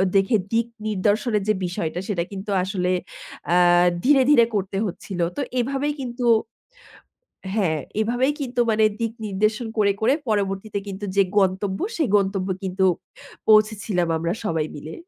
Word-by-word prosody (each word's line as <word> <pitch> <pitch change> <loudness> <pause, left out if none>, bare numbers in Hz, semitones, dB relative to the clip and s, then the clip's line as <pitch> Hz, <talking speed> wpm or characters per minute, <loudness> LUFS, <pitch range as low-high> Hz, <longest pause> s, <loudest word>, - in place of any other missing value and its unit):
দেখে, 195 +4 +3 0.2
দিক 230 0 +2 0.2
নির্দেশনের 210 +1 +1
যে 215 - +4
বিষয়টা 175 -1 -3
সেটা 185 -5 -1
কিন্তু 195 +1 -7
আসলে 185 -1 -1 0.6
অ্যা 175 +1 +4 0.4
ধীরে, 275 0 +5
ধীরে 240 -6 +6
করতে 195 0 -2
হচ্ছিল। 190 -1 -6 0.2
তো - - 0 0.2
এভাবেই 275 +4 -1
কিন্তু, 245 -1 -4 1.3
হ্যাঁ 180 -8 +1 0.2
এভাবেই 245 +5 +1
কিন্তু 250 -3 -2
মানে 220 0 +3 0.2
দিক 230 -1 -1
নির্দেশন 215 +3 0
করে, 205 -1 +4
করে 235 +5 +3
পরবর্তীতে 200 0 -1
কিন্তু 195 +1 -6
যে 200 - +6 0.2
গন্তব্য 190 0 +1 0.2
সেই 315 -5 +1
গন্তব্যে 195 -1 0
কিন্তু 190 0 +1 0.6
পৌঁছেছিলাম 215 -4 +3
আমরা 170 +1 -1
সবাই 160 -5 0
মিলে। 155 +2 -8
205 Hz, 140 wpm, -23 LUFS, 190-225 Hz, 1.3 s, ধীরে